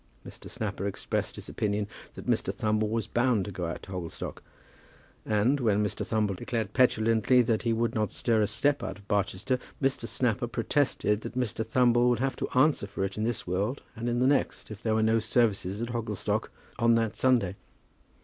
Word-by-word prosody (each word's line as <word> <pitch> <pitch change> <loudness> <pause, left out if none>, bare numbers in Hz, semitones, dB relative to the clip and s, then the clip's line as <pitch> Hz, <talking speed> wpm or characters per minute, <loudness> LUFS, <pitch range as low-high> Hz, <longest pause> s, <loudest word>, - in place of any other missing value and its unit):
Mr. - - -10
Snapper 100 - -3
expressed 100 - -2
his - - -9
opinion 105 0 -1 0.3
that - - -9
Mr. - - +1
Thumble 110 0 0
was 115 0 -1
bound 120 -5 +1
to 100 - -5
go 90 -2 -3
out 85 - -5
to 95 - -10
Hogglestock; 90 -3 -5 0.9
and, 110 +7 +2
when 105 -4 +2
Mr. 105 - -3
Thumble 105 -3 0
declared 110 +1 -3
petulantly 115 0 +4
that 110 -2 +1
he 115 - 0
would 115 +1 0
not 110 -2 0
stir 115 -2 +1
a 105 - +2
step 140 +7 +1
out - - -4
of 100 0 -18
Barchester, 100 +5 0 0.2
Mr. 135 -1 0
Snapper 120 -1 0
protested 115 -2 +1
that 120 - -7
Mr. 115 -3 -1
Thumble 120 +1 +3
would 120 - +3
have 135 +1 0
to - - -3
answer 135 -6 +3
for 100 -1 -3
it 95 0 -2
in 110 - -1
this 120 -1 -2
world 100 +9 -1
and 120 +1 -3
in 120 - 0
the 125 - +3
next 135 -4 +1
if 110 0 -8
there 110 -1 +1
were 110 - +2
no 110 +1 +3
services 110 -3 +1
at 120 - -4
Hogglestock 115 -4 -2 0.3
on 115 0 +5
that 115 -2 0
Sunday. 120 -8 +2
110 Hz, 195 wpm, -28 LUFS, 105-120 Hz, 0.9 s, on